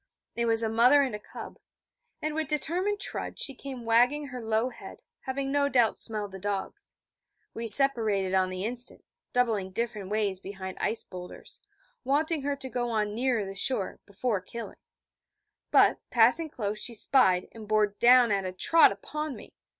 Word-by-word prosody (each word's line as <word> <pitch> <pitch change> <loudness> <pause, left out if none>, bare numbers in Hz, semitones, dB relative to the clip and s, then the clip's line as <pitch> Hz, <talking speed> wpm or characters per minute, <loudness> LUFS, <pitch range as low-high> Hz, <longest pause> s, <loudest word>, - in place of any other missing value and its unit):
It 235 - 0
was 225 0 +4
a - - +1
mother 245 +6 +5
and 210 -6 -4
cub: - - -10 0.6
and 310 0 -2
with 315 -1 -2
determined 355 +8 -1
trudge - - -6
she 275 - -1
came 260 -2 -9
wagging 250 +6 +2
her 250 -1 -7
low 220 +2 0
head, 245 - -12 0.2
having 270 0 -3
no 285 0 +1
doubt 240 -5 +3
smelled 210 -2 -2
the 190 - -9
dogs. 205 - -5 0.6
We 230 0 -5
separated 215 -7 +4
on 185 -1 +2
the 185 +1 -4
instant, 245 +2 -1 0.3
doubling 225 -6 0
different 210 -1 -4
ways 205 -3 -1
behind 190 -1 -8
ice 225 - -1
boulders, 180 -1 -9 0.4
wanting 305 +3 0
her 285 +1 -2
to 270 -1 -7
go 245 -1 -3
on 210 -2 -1
nearer 240 -2 0
the 195 - -7
shore, 195 0 -2
before 205 0 -2
killing; 230 +5 -9 0.9
but, - - +4
passing 250 +8 +4
close, 210 -6 -4
she 235 +2 -3
spied, 190 -7 +3
and 220 -2 -11
bore 215 0 +3
down 240 +3 +4
at 200 -1 0
a 185 - -4
trot 320 - +5
upon 300 +8 -5
me. - - -13
230 Hz, 170 wpm, -28 LUFS, 205-270 Hz, 0.9 s, mother